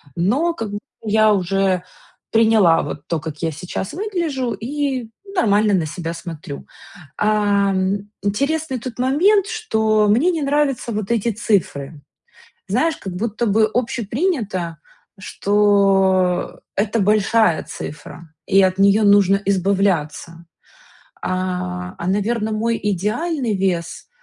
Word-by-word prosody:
Но, 265 - +1
как 225 -9 -5
б 205 - -3 0.2
я 215 0 +3
уже 190 -1 +1 0.5
приняла 220 -7 +4
вот 145 - -7
то, 165 -2 -1
как 155 -1 -7
я 165 -1 0
сейчас 180 +5 -5
выгляжу, 330 - -2
и 260 -1 -3 0.3
нормально 210 - +3
на 170 -4 +2
себя 165 +2 -5
смотрю. 165 -4 -8 0.5
Ам, 200 -1 +1
интересный 280 +6 -1
тут 245 0 -8
момент, 370 +10 +3
что 220 - +1
мне 280 +13 +3
не 325 -3 -2
нравятся 275 -4 0
вот 215 0 -3
эти 230 0 +1
цифры. 160 -9 -1 0.7
Знаешь, 325 -1 +1
как 190 -2 -7
будто 230 +3 -2
бы 215 +1 +3
общепринято, 225 - -2 0.4
что 195 -3 +2
это 215 +3 0
большая 210 -2 +3
цифра 160 +1 -9
и 195 0 +5
от 185 0 +1
неё 200 +2 +4
нужно 200 -1 +5
избавляться. 180 -4 0 0.8
А, 180 0 -3
а, 170 - -5
наверно, 215 +2 0
мой 230 +2 0
идеальный 215 - -1
вес, 180 -3 -2
205 Hz, 120 wpm, -20 LUFS, 185-235 Hz, 0.8 s, и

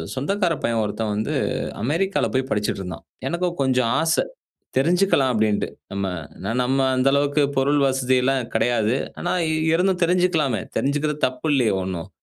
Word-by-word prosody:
சொந்தக்காரப் 175 +6 -1
பையன் 115 -1 +1
ஒருத்தன் 105 +1 -2
வந்து, 110 +1 -2 0.5
அமெரிக்காவில் 170 +10 0
போய் 130 +1 0
படிச்சிட்டு 105 -1 -1
இருந்தான். 90 -2 -7 0.2
எனக்கும் 175 0 -2
கொஞ்சம் 125 -3 +2
ஆசை. 160 0 +2 0.5
தெரிஞ்சுக்கலாம் 165 -2 +3
அப்படீன்னுட்டு, 110 -2 +1 0.2
நம்ம 100 0 -2 0.3
ஏன்னா, 100 - -3
நம்ம 130 +2 +1 0.2
அந்த 130 +1 +2
அளவுக்கு 145 +1 +2 0.2
பொருள் 145 +2 +2
வசதியெல்லாம் 130 0 +1
கிடையாது. 120 -1 +2 0.2
ஆனா, 175 - -2 0.4
இருந்தும் 180 +1 +1
தெரிஞ்சுக்கலாமே. 170 - +2 0.2
தெரிஞ்சுக்கிறது 150 +2 0
தப்பு 130 +4 -5
இல்லையே 125 -6 +3
ஒண்ணும்! 90 -1 -5
135 Hz, 135 wpm, -22 LUFS, 115-160 Hz, 0.5 s, தெரிஞ்சுக்கலாம்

